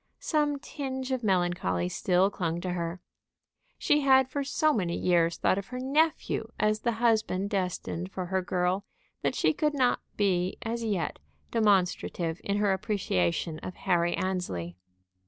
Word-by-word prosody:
Some 295 -2 0
tinge 265 -2 -5
of 255 -2 -1
melancholy 175 - +1
still 185 - +2
clung 170 -4 -2
to 180 0 -2
her. 170 0 -3 0.8
She 295 - +3
had 265 -2 +5
for 280 +2 -2
so 305 +2 +2
many 175 -8 -1
years 170 -2 +2
thought 190 - +2
of 200 - -8
her 250 - -6
nephew 275 -3 +1
as 215 0 +2
the 235 +1 0
husband 220 -4 +1
destined 185 -2 -2
for 185 -2 -4
her 190 +1 0
girl, 180 +1 0 0.4
that - - 0
she - - +2
could 300 -1 0
not 255 -3 +2 0.2
be 185 -3 +1
as 230 +1 -3
yet 195 -8 -1 0.3
demonstrative 180 -5 +1
in 200 0 0
her 205 -1 +3
appreciation 165 - -1
of 185 - -7
Harry 175 -2 +1
Annesley. 180 - -3
195 Hz, 155 wpm, -28 LUFS, 175-240 Hz, 0.8 s, had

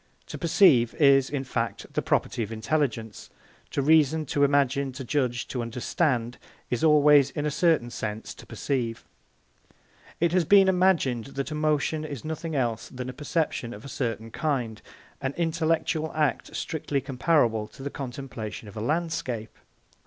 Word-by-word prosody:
To - - -5
perceive 155 - +4
is, 140 -3 +5
in 140 -2 -2
fact, 115 -5 -3
the - - 0
property 120 - 0
of 110 -1 -3
intelligence; 115 -2 -2 0.4
to 140 - -1
reason, 155 +1 +4
to 145 - +3
imagine, 140 -1 +2
to 130 - -6
judge, 125 -2 -1
to 125 - -3
understand, 120 +1 -1 0.3
is 125 - -1
always, 150 -3 +6
in 145 - -4
a 150 - 0
certain 155 -7 +2
sense, 110 -1 -5
to - - -14
perceive. 120 -5 -3 1.1
It 170 0 +2
has 180 0 +3
been 195 +3 +6
imagined 180 -11 +2
that 140 +2 -2
emotion 155 0 0
is 145 -5 -7
nothing 160 0 -4
else 120 -5 -1
than 125 -1 -6
a - - -6
perception 145 -3 -2
of 105 - -12
a 140 - -8
certain 115 -3 -3
kind, 125 -8 -2 0.4
an 135 0 -2
intellectual 160 -1 0
act 150 -3 0
strictly 150 -3 -2
comparable 130 -5 +1
to 135 - -13
the 140 - -4
contemplation 125 -5 -6
of 100 - -11
a 105 - -4
landscape. 140 -6 -2
140 Hz, 155 wpm, -26 LUFS, 120-155 Hz, 1.1 s, always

